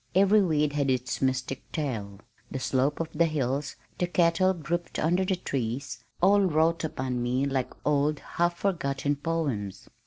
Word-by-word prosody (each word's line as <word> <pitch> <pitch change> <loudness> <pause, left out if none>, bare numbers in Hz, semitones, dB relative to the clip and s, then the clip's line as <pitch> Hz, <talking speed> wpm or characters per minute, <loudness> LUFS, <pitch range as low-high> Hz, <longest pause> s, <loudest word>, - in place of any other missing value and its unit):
Every 200 +2 +5
weed 150 -5 +1
had 140 -2 +1
its 125 -1 -1
mystic 130 0 -2
tale. 110 -10 -4 0.3
The - - -4
slopes 135 +3 0
of 160 - -3
the 170 +2 +3
hills, 140 -2 -1 0.2
the 180 - +1
cattle 175 +1 +3
grouped 170 +2 -3
under 175 +4 +2
the 190 0 +1
trees, 130 -5 -4 0.2
all 200 +2 +6
wrought 165 -2 +2
upon 130 -5 -2
me 125 +3 +1
like 135 -2 -1 0.2
old 150 +1 +2
half 175 +3 -1
forgotten 145 -7 0
poems. 140 - -3
150 Hz, 155 wpm, -27 LUFS, 130-170 Hz, 0.3 s, all